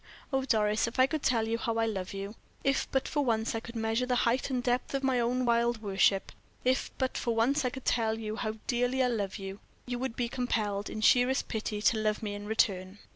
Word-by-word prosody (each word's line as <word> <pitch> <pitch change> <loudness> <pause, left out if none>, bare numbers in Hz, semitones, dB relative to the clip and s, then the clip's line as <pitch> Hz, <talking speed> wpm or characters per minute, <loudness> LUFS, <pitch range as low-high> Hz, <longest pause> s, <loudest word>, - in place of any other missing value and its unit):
Oh, 265 0 +1
Doris, 215 -2 +2
if 230 - -6
I 260 - +7
could 310 +2 -2
tell 230 -5 +2
you 230 +1 -1
how 230 0 -1
I 225 - +2
love 195 -5 -3
you, 195 +1 -5 0.3
if 275 0 +1
but 265 - +1
for 290 -2 0
once 225 -3 0
I 225 - -1
could 235 +1 -10
measure 225 +2 0
the 250 - +1
height 240 +4 +1
and 250 -2 -1
depth 250 +2 0
of 275 - -1
my 260 -2 +2
own 250 +2 +1
wild 235 -1 +2
worship, 195 -1 +2 0.3
if 260 +1 +2
but 260 -1 -1
for 235 -1 -1
once 270 +6 +2
I - - +2
could 260 +1 -9
tell 225 -2 +1
you 215 -1 -4
how 215 -2 -2
dearly 245 +1 +1
I - - +3
love 205 -5 -2
you, 195 0 -7 0.3
you 245 -1 -3
would 260 -2 -3
be 245 - -1
compelled, 215 -5 -1
in 215 - -5
sheerest 250 +4 +4
pity, 215 -2 -3
to 220 - +4
love 215 0 0
me 205 -1 -2
in 205 0 -7
return." 195 -3 0
230 Hz, 235 wpm, -30 LUFS, 215-250 Hz, 0.3 s, I